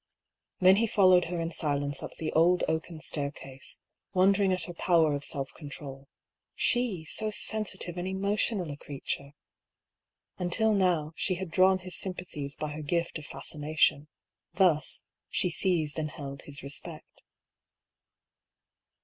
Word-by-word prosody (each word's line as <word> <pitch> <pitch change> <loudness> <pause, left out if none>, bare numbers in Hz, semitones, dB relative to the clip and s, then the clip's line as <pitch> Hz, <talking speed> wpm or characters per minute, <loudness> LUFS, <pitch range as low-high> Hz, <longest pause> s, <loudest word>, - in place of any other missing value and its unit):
Then 185 +1 +7
he 230 +2 +2
followed 185 -4 +5
her 175 0 -3
in 165 0 -2
silence 145 -3 0
up - - -7
the 160 - -3
old 175 +3 +4
oaken 160 0 -3
staircase, 140 -4 -2 0.3
wondering 195 +1 +4
at 180 -2 0
her 175 - -6
power 165 -3 +3
of 145 0 -3
self 135 -2 -2
control 140 -2 -9 0.2
— - - -60
she, 235 -10 +1
so 215 +6 0
sensitive 210 -4 -1
and 175 +1 -3
emotional 195 -2 0
a 145 - -7
creature! 140 0 -5 1.1
Until 215 +5 +2
now, 175 -6 +1
she 185 - 0
had 180 -1 -6
drawn 185 +2 +5
his 185 -1 -3
sympathies 170 -6 -2
by 155 - -4
her 150 +1 -6
gift 170 +2 -1
of 150 - -10
fascination; 150 -1 +1 0.5
thus, 165 -7 +2 0.3
she 180 - +1
seized 160 -4 0
and 155 -1 -2
held 140 -3 -7
his 140 -2 -7
respect. 140 0 -8
170 Hz, 140 wpm, -29 LUFS, 150-185 Hz, 1.1 s, Then